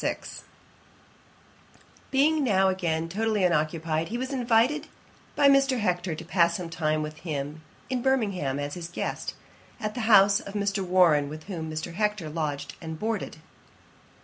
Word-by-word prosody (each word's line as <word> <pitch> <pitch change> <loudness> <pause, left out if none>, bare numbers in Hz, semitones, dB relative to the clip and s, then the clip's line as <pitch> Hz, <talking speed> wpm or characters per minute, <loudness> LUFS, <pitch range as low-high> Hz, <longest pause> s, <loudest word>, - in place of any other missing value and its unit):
] - - -10 2.1
Being 295 +3 +3
now 195 -6 +3
again 165 -3 -1
totally 215 +3 0
unoccupied, 160 -1 0
he 235 - -3
was 260 +2 -4
invited 250 +5 +2 0.5
by 285 - +5
Mr. 275 -1 +4
Hector 180 -4 -1
to - - -9
pass 170 -1 +2
some 170 -2 -6
time 155 -2 0
with 150 0 -6
him 150 -2 -5 0.3
at 255 -1 0
Birmingham, 200 - 0
as 145 0 -3
his 170 -2 -6
guest, 175 - -4 0.4
at 215 0 -3
the 245 - -4
house 200 -1 +7
of 200 - -9
Mr. 200 -1 0
Warren, 175 -6 +4
with 155 +1 -8
whom 165 -4 -5
Mr. 155 +2 -5
Hector 210 -4 -1
lodged 145 -3 -3
and 160 -1 -6
boarded. 220 +4 -3
180 Hz, 150 wpm, -27 LUFS, 160-220 Hz, 2.1 s, house